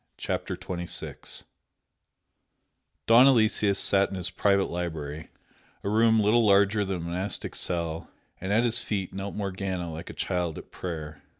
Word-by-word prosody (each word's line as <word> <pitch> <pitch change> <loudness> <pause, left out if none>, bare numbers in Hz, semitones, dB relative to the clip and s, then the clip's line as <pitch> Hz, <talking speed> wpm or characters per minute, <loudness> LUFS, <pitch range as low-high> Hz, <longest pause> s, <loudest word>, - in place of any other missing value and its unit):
CHAPTER - - -3
XXVI 90 -1 -5 1.6
Don 120 +4 +7
Aloysius 110 -5 +3
sat 100 0 +4
in - - -6
his 90 -2 -3
private 100 -1 +2
library, 80 -3 -5 0.5
a 100 - -1
room 110 +1 +4
little 110 +3 +4
larger 100 0 +4
than 95 -1 -2
a - - -6
monastic 90 +4 -3
cell, 85 -2 -2 0.3
and 95 +2 -4
at 110 +3 +4
his 120 -1 +2
feet 100 -5 -3
knelt 100 +1 -5
Morgana 95 -4 -3
like 80 +3 -8
a - - -7
child 90 -4 -2
at - - -11
prayer. 80 -4 -6
95 Hz, 145 wpm, -27 LUFS, 85-105 Hz, 1.6 s, Don